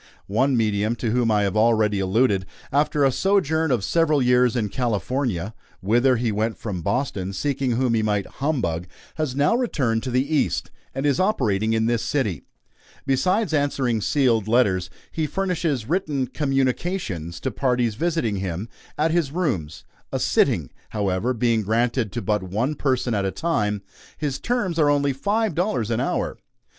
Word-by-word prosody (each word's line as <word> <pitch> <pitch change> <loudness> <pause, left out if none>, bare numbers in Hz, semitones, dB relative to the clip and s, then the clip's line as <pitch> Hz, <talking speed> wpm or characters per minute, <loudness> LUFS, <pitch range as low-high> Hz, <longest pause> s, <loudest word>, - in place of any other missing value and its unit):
One 130 +6 +1
medium 110 0 +1
to 115 -1 -2
whom 120 -1 +2
I 105 -1 +3
have 100 0 -1
already 110 -2 +3
alluded, 95 0 +1 0.2
after 145 0 +2
a 135 - +4
sojourn 160 -2 +1
of 120 -7 +1
several 160 0 +2
years 125 -1 +3
in 110 -4 0
California 115 -3 -1 0.3
whither 120 +7 +3
he 115 -1 0
went 110 0 -1
from 95 -6 -4
Boston, 100 - -2
seeking 135 +3 -1
whom 125 0 +1
he 110 - +2
might 105 -2 0
humbug 120 - -2 0.3
has 155 -5 -2
now 145 +9 +3
returned 135 - 0
to 130 - -4
the 125 +2 +1
East, - - 0 0.2
and 135 - -2
is 140 -2 +2
operating 110 - +1
in 110 0 +1
this 115 0 +1
city. 110 - -1 0.6
Besides 175 - +1
answering 135 -6 +1
sealed 115 -5 +2
letters, 100 -6 +2 0.2
he 160 -1 -1
furnishes 165 - -1
written 155 -5 0
"communications" 130 - -2
to - - -2
parties 125 -4 +1
visiting 155 - -1
him 95 +3 -4 0.3
at 155 +2 +2
his 165 -5 +1
rooms 120 - -2 0.3
a - - -1
"sitting," - - +2 0.2
however, 100 +2 0
being 115 -2 +1
granted 115 +1 0
to 120 - -3
but 105 -2 +1
one 105 +10 -1
person 130 -4 0
at 100 -2 0
a 95 - 0
time. 105 - -1 0.3
His 140 -3 -2
terms 205 -9 -1
are 150 -2 +4
only 145 -1 +2
five 205 - 0
dollars 135 - -1
an 115 - 0
hour. 130 - -1
125 Hz, 165 wpm, -23 LUFS, 105-145 Hz, 0.6 s, a